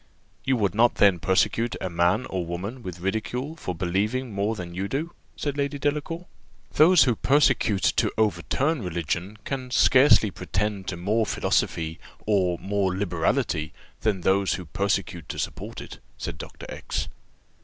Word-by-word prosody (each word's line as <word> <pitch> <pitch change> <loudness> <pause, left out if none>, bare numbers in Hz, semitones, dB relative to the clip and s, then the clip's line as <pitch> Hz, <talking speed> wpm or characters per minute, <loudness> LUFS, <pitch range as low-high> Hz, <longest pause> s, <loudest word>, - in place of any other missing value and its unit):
"You 130 - +2
would 100 -4 +1
not 115 +3 +4
then 100 -4 +4
persecute 115 +6 +1
a - - -2
man 90 +7 +1
or 95 -2 -3
woman 95 +9 -5
with 90 -5 -7
ridicule 120 - -2
for 90 - -5
believing 105 +8 -1
more 100 +3 0
than 90 -4 -7
you 95 +3 -2
do?" 155 +9 -3 0.2
said 145 -2 -3
Lady 140 0 -1
Delacour. 150 +4 -2 0.5
"Those 170 +2 +7
who 125 - +3
persecute, 130 -7 +2
to - - +2
overturn 110 - +1
religion, 90 +2 -3
can 130 -2 -4
scarcely 130 -4 +5
pretend 100 0 -3
to 90 - -3
more 105 +5 +1
philosophy, 80 0 0 0.3
or 95 -5 +2
more 95 -1 -1
liberality, 85 -5 0 0.3
than 105 -4 0
those 95 +2 +2
who 90 - -5
persecute 100 +6 -2
to - - -5
support - - -5
it," - - -9 0.2
said - - -5
Dr. - - -9
X - - -4
100 Hz, 155 wpm, -25 LUFS, 90-130 Hz, 0.5 s, Those